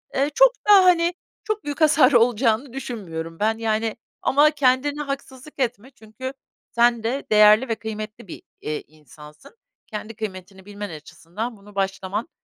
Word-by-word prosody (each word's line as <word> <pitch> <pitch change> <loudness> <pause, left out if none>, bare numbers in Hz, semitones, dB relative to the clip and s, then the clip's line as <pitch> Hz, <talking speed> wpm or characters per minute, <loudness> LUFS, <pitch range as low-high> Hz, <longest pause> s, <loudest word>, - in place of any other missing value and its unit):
Eee, 275 +2 +1
çok - - +6 0.2
da, 390 -2 +8
hani, 345 -1 +4 0.3
çok 430 -1 -3
büyük 290 +2 -5
hasar 300 -3 +5
olacağını 235 +1 +2
düşünmüyorum 165 -11 -6
ben, 220 +1 +1
yani, 225 0 -1 0.2
ama 295 +3 +4
kendine 285 0 +1
haksızlık 275 0 -7
etme 250 0 -2
çünkü 250 +3 -8 0.4
sen 235 -1 +2
de 250 +5 -2
değerli 215 +3 +6
ve 225 - -1
kıymetli 215 -1 -7
bir, - - -10 0.2
eee, 150 0 -4
insansın. 150 - -16 0.3
Kendi 215 -1 -7
kıymetini 190 -3 -8
bilmen 205 0 -7
açısından 175 +8 -7
bunu 200 +1 -17
başlaman, 195 - -3
225 Hz, 145 wpm, -23 LUFS, 205-275 Hz, 0.4 s, da